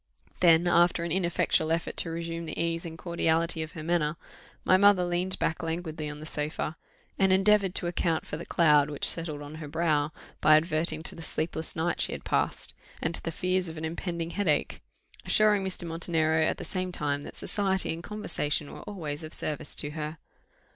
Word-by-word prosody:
Then, 170 -1 +5
after 175 0 +4
an 170 - -3
ineffectual 170 -3 +1
effort 165 0 -1
to 165 - 0
resume 165 0 -4
the 155 - -5
ease 165 +1 -1
and 165 0 -8
cordiality 165 -1 +1
of 160 0 -6
her 155 - -7
manner, 160 -2 +1 0.5
my - - +6
mother 195 -1 +5
leaned 175 +2 -1
back 160 - -1
languidly 160 -2 -3
on 150 0 -7
the 155 - -8
sofa, 155 0 -3 0.4
and 190 -1 +4
endeavoured 195 0 +4
to - - -1
account 170 -1 0
for - - -5
the 165 - -6
cloud 150 -3 +4
which 145 - 0
settled 155 -3 -1
on 145 +1 -9
her 150 - -6
brow 155 -1 +1 0.3
by 155 - +7
adverting 160 0 0
to - - -5
the 165 - -10
sleepless 160 0 -3
night 170 +1 0
she - - +2
had - - -7
passed, - - 0 0.3
and 160 - -1
to - - -4
the 165 - -3
fears 185 +2 0
of 160 - -8
an 155 - -3
impending 170 0 -3
headache; 170 -8 0 0.4
assuring 210 -2 +4
Mr. 190 -2 -2
Montenero 165 -1 +1
at - - 0
the - - -6
same 185 -1 -2
time 145 -4 -1
that - - -9
society 190 -4 0
and 165 - -7
conversation 170 -8 -2
were - - -9
always 160 -6 -5
of 155 - -3
service 150 -1 -2
to 145 - +2
her. 155 +1 -5
165 Hz, 195 wpm, -28 LUFS, 155-175 Hz, 0.5 s, by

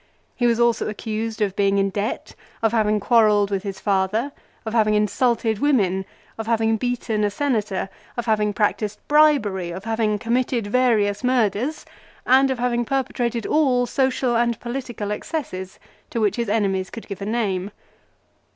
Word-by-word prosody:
He 245 - +1
was 235 -1 +2
also 235 -2 +2
accused 220 +1 -3
of 195 -2 -2
being 200 0 +2
in 195 0 +1
debt, 205 +4 -3 0.3
of 225 - +3
having 215 -2 +2
quarrelled 210 -2 +3
with 195 -1 0
his 195 -1 -6
father, 205 +6 0 0.3
of 220 - -4
having 215 -2 +3
insulted 220 +1 +1
women, 195 -10 +2 0.3
of 225 - -4
having 225 -1 +2
beaten 235 -2 -1
a 205 - +2
Senator, 210 -5 -1 0.3
of 240 - -2
having 210 -2 +1
practised 210 0 -1
bribery, 275 - +3
of 185 +3 -6
having 220 -1 0
committed 235 +1 0
various 210 -2 +1
murders, 250 +3 0 0.4
and 265 +2 +5
of 265 - -1
having 240 0 0
perpetrated 240 -3 -2
all 260 -5 +2
social 260 -1 0
and 235 -1 +1
political 240 -4 -5
excesses 210 - -5 0.3
to 235 - -3
which 210 0 +1
his 235 -3 -1
enemies 195 -3 0
could 230 - -9
give 200 -2 -7
a - - -3
name. 205 -4 -1
220 Hz, 160 wpm, -22 LUFS, 205-245 Hz, 0.4 s, and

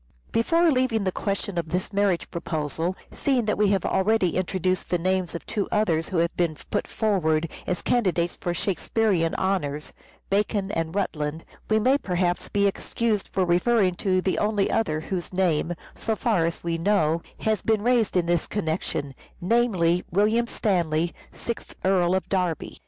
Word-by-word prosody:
Before 330 +9 +3
leaving 255 -5 +1
the 190 - 0
question 195 -2 -2
of 165 -2 -4
this 180 +5 -2
marriage 200 -3 +1
proposal, 165 +1 -2 0.2
seeing 260 -5 +1
that 210 - +1
we 210 0 +3
have 195 -2 +1
already 195 -2 +2
introduced 185 0 -1
the 175 - +2
names 185 0 0
of 170 - -6
two 210 -3 -2
others 165 -6 +1
who 185 - -2
have 170 0 +1
been 170 -3 0
put - - 0
forward 165 -7 +1 0.2
as 180 - -2
candidates 180 -8 +1
for 175 - -3
Shakespearean 185 -1 0
honours, 150 -6 -1 0.4
Bacon 200 0 +1
and 165 -2 -2
Rutland, 155 -5 -2 0.2
we 215 - +4
may 260 +6 +3
perhaps 180 -4 -1
be 200 -1 +2
excused 210 +1 0
for 190 -1 +1
referring 185 +2 +3
to 185 -2 +1
the 185 - 0
only 210 -2 +1
other 155 -9 0
whose 175 +1 -4
name, 175 -2 +1 0.2
so 220 - -2
far 215 -8 +1
as 165 - -3
we 165 -1 -1
know, 165 -4 +2 0.2
has 220 -1 +1
been 220 -2 +1
raised 235 -5 +2
in 175 - +2
this 170 -1 +1
connection, 160 -6 -2 0.3
namely 180 -5 +2
William 215 +6 +2
Stanley, 170 -7 0 0.2
Sixth 235 - -6
Earl 185 -1 +3
of 190 - -1
Derby. 180 -5 -2
185 Hz, 165 wpm, -25 LUFS, 170-210 Hz, 0.4 s, we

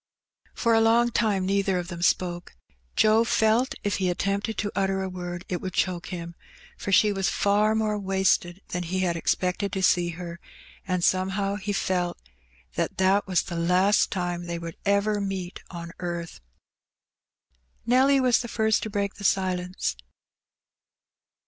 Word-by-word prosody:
For 230 -1 +2
a 225 - +5
long 235 +2 +4
time 205 -5 +1
neither 195 -1 +1
of 175 0 -4
them 170 -2 -7
spoke. 175 0 0 0.4
Joe 220 +1 +5
felt 230 +2 +2
if 205 -2 0
he 185 -2 0
attempted 200 +4 -1
to 205 -1 -2
utter 195 -1 0
a 190 - -3
word 175 -1 -6
it 180 - -3
would 185 -1 -5
choke 180 -1 0
him, 170 -2 -6 0.4
for 200 - -5
she 210 +2 +5
was 195 -2 0
far 210 +2 +2
more 215 -1 0
wasted 190 -1 +1
than 180 - -2
he 185 +2 -2
had 175 -2 +1
expected 180 +3 -1
to 190 - -2
see 175 -1 +3
her, 170 -1 -7 0.5
and 180 -1 -1
some 185 +1 +2
how 195 +1 -1
he 205 0 -3
felt 180 -3 -1 0.6
that - - -2
that 190 +2 +3
was 185 -3 +2
the 170 - -6
last 180 +5 +3
time 175 -2 -3
they 170 0 -3
would 170 -1 -7
ever 200 +1 +2
meet 190 -2 -4
on 170 -1 -7
earth. 175 -2 -5 1.5
Nelly 265 +3 +4
was 250 -2 +3
the 240 - -4
first 220 -1 +1
to 220 - -4
break 200 -1 -2
the 200 - -9
silence. 185 - 0
190 Hz, 165 wpm, -26 LUFS, 180-205 Hz, 1.5 s, a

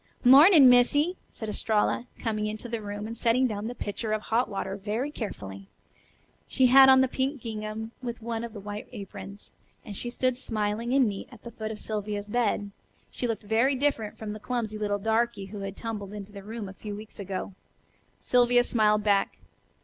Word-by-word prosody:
"Mornin', 280 +3 +9
Missy," 290 +8 +4
said 220 - -7
Estralla, 215 +3 0
coming 215 -2 -2
into 215 +3 -5
the 230 -1 -4
room, 205 0 -5
and 225 +1 -6
setting 235 +2 +2
down 215 -3 -2
the 245 - -5
pitcher 215 0 -3
of 215 - -1
hot 235 +3 +1
water 195 -1 -3
very 215 +8 -3
carefully. 100 - -7 0.8
She 260 - +2
had 265 +1 +8
on 265 0 +7
the 265 - +3
pink 265 +2 -2
gingham 220 -1 -5
with 240 -2 -5
one 230 0 -4
of 235 -2 -6
the 210 - -7
white 205 +1 -7
aprons, 200 -2 -9 0.3
and - - -8
as 200 - -6
she 240 - -4
stood 255 +1 0
smiling 220 -1 -2
and 265 -3 +5
neat 200 -2 -5
at 235 -4 -15
the 235 - -8
foot 220 -2 -5
of 215 - -7
Sylvia's 210 -1 -4
bed, 210 -3 0 0.4
she 245 - -3
looked 225 -2 -3
very 230 +6 +2
different 260 -6 -1
from 215 -1 -5
the 215 - -8
clumsy 220 -2 -3
little 205 -1 0
darky 220 0 0
who 200 +2 -8
had 195 0 -6
tumbled 210 -3 -5
into 205 -1 -8
the 200 -1 -9
room 215 +1 -6
a 190 - -9
few 205 +1 -7
weeks 215 +1 -11
ago. 195 0 -5 0.7
Sylvia 245 0 +4
smiled 210 -3 +2
back. 200 -2 +2
220 Hz, 195 wpm, -27 LUFS, 205-245 Hz, 0.8 s, Mornin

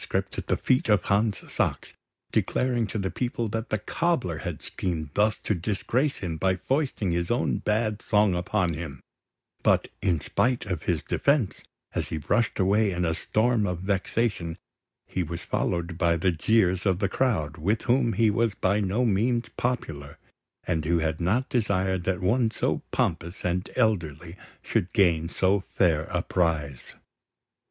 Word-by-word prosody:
at - - 0 0.2
the - - +1
feet 125 -2 +1
of 105 -4 +4
Hans 105 +1 +1
Sachs, - - -1 0.4
declaring 120 -3 +1
to 105 - -4
the 95 -2 -2
people 120 -2 -2
that 115 +3 -3
the 110 - +1
cobbler 120 - -1
had - - -5
schemed 80 -5 -3
thus 105 +1 +2
to - - +1
disgrace 110 - 0
him 80 -2 -3
by 95 +2 +2
foisting 130 - -1
his 85 0 -1
own 120 - +1
bad 110 0 0
song 105 -2 +3
upon 90 0 0
him; 80 -3 -7 0.6
but - - +3
in 90 -6 +2
spite 125 - 0
of 90 -5 -3
his 80 -4 -1
defence, 140 -8 +1 0.3
as - - -2
he 80 - -3
rushed 115 +10 0
away 100 +2 +3
in 90 -1 -1
a 80 - +1
storm 110 +4 +1
of 90 -1 -3
vexation, 95 -2 -1 0.5
he 95 - -3
was 85 0 -4
followed 85 0 -2
by 85 -2 +3
the 90 +2 +2
jeers 95 +2 +2
of 95 -2 +2
the 100 +1 +1
crowd, 85 - 0
with 100 +8 0
whom 120 -2 +2
he 110 -1 +3
was 110 -1 +1
by 100 +3 +1
no 105 +5 +1
means 115 +3 +1
popular, 80 - -3 0.5
and 80 -3 0
who 85 +3 +2
had 80 -1 -1
not 110 +10 +1
desired 95 -6 0
that 95 -2 0
one 115 +5 +2
so - - -1
pompous 85 +2 -2
and 90 +1 -1
elderly 85 - 0 0.3
should 90 - -1
gain 85 -4 +3
so 95 +3 +2
fair 85 -5 +1
a 90 0 -2
prize. 75 -7 -1
95 Hz, 165 wpm, -26 LUFS, 85-110 Hz, 0.6 s, of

